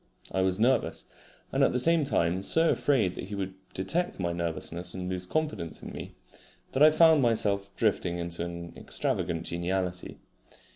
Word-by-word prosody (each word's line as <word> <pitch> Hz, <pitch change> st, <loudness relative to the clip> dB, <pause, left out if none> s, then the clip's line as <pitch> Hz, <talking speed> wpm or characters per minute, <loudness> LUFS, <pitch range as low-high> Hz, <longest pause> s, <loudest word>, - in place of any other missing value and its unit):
I 95 Hz, -, 0 dB
was 95 Hz, +1 st, +1 dB
nervous, 125 Hz, +2 st, +1 dB, 0.5 s
and -, -, +2 dB
at -, -, +3 dB
the -, -, +1 dB
same 165 Hz, +5 st, +3 dB
time 90 Hz, -, +1 dB
so 160 Hz, +11 st, +4 dB
afraid 115 Hz, -11 st, +2 dB
that -, -, -6 dB
he 100 Hz, +2 st, -6 dB
should 95 Hz, -1 st, -4 dB, 0.2 s
detect 165 Hz, -, -1 dB
my 85 Hz, -2 st, -1 dB
nervousness 85 Hz, +1 st, -3 dB
and 90 Hz, -1 st, -4 dB
lose 90 Hz, 0 st, -4 dB
confidence 150 Hz, -, -3 dB
in -, -, -7 dB
me, -, -, -8 dB, 0.6 s
that 135 Hz, -, -1 dB
I 155 Hz, -, +10 dB
found 160 Hz, -1 st, +5 dB
myself 100 Hz, -5 st, +1 dB
drifting 95 Hz, -5 st, 0 dB
into 85 Hz, 0 st, -4 dB
an 85 Hz, 0 st, -6 dB
extravagant 85 Hz, -1 st, -1 dB
geniality. 90 Hz, +1 st, -3 dB
95 Hz, 165 wpm, -28 LUFS, 85-125 Hz, 0.6 s, I